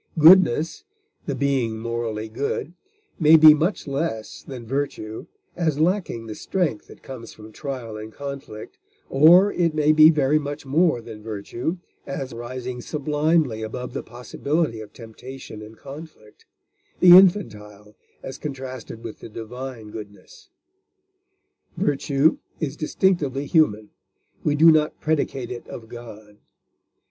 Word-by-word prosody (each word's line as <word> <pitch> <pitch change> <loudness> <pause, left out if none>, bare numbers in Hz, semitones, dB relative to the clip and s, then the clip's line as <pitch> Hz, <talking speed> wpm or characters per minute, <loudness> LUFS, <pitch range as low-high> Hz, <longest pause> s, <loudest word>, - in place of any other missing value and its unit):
Goodness, 160 -2 +5 0.4
the 140 - -1
being 130 -5 0
morally 115 -1 -4
good, 140 +7 -3 0.5
may 160 -1 +7
be 155 -1 +9
much 165 +7 -1
less 140 -6 -4
than 125 -4 -9
virtue, 120 -4 -4 0.3
as 160 -5 0
lacking 165 - 0
the 110 - -6
strength 160 - -2
that - - -16
comes 120 -4 -9
from 110 0 -13
trial 125 -4 -6
and 110 +1 -8
conflict, 140 -5 -8 0.3
or 175 +8 +6
it 165 -3 0
may 150 0 +3
be 155 0 +8
very 150 -1 +2
much 145 0 -6
more 155 -1 +2
than 115 -2 -10
virtue, 115 - -4 0.3
as 135 -2 -5
rising 125 +1 -6
sublimely 150 -3 0
above 125 +3 -6
the - - -3
possibility 125 +2 -3
of 105 - -11
temptation 115 0 -10
and 110 +1 -12
conflict 140 -7 -13 0.5
the 180 -1 +9
infantile 105 - +2 0.3
as 135 - -7
contrasted 130 -5 -7
with 115 -2 -8
the - - -10
divine 115 0 -8
goodness. 110 - -12 1.3
Virtue 140 +1 +1 0.2
is 150 -2 -3
distinctively 155 -4 0
human; 110 -10 +2 0.5
we 145 - +1
do 165 +2 +7
not 155 -1 +1
predicate 140 -5 -2
it 120 - -7
of 110 -1 -10
God. 110 -3 -11
135 Hz, 130 wpm, -23 LUFS, 115-155 Hz, 1.3 s, be